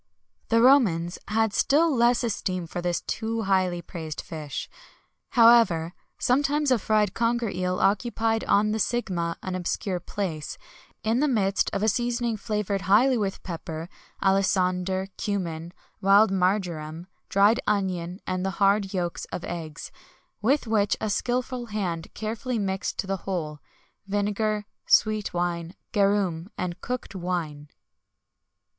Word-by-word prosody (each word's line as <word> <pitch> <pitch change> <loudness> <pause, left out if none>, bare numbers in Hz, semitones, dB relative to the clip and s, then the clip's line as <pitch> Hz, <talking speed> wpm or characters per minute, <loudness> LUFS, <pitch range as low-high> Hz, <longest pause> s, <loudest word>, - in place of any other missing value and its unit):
The 230 0 +4
Romans 185 -11 +4
had 220 0 +1
still 305 +4 +3
less 240 +1 +3
esteem 185 -5 -2
for 175 +2 -5
this 175 0 -1
too 225 0 -3
highly 185 -3 +1
praised 160 -2 -6
fish. 150 -3 -5 0.7
However, 225 -8 +6 0.2
sometimes 285 +2 +2
a 250 - +4
fried 210 -1 +1
conger 235 -1 0
eel 180 0 -1
occupied 225 +3 +1
on 210 +1 +3
the 220 - -1
sigma 180 -7 -1
an 185 - -3
obscure 185 +1 -2
place, 165 -5 -4 0.5
in 225 +3 +1
the 300 - +3
midst 200 -7 +1
of 200 - -2
a - - +3
seasoning 240 +1 0
flavoured 210 -2 -2
highly 250 +6 +5
with 200 -4 -2
pepper, 165 -2 -6 0.3
alisander, 190 -1 +2 0.2
cummin, 170 -5 -3 0.3
wild 200 +2 +6
marjoram, 180 -4 -1 0.2
dried 205 +5 +4
onion, 185 -3 -1
and 185 0 -1
hard 195 0 +2
yolks 175 -2 -2
of - - -6
eggs; 165 -3 -6 0.5
with 270 +7 +2
which 210 -2 +1
a 215 - -1
skilful 245 +2 -1
hand 180 -6 -3
carefully 230 +3 -3
mixed 195 -2 -2
to - - -1
the 195 0 -1
whole, 165 -6 -4 0.5
vinegar, 210 +1 0 0.2
sweet 215 -1 +3
wine, 175 0 -2 0.2
garum, 195 -5 +1
and 180 -1 -4
cooked 250 -4 -4
wine. 170 -6 -4
195 Hz, 130 wpm, -26 LUFS, 175-225 Hz, 0.7 s, However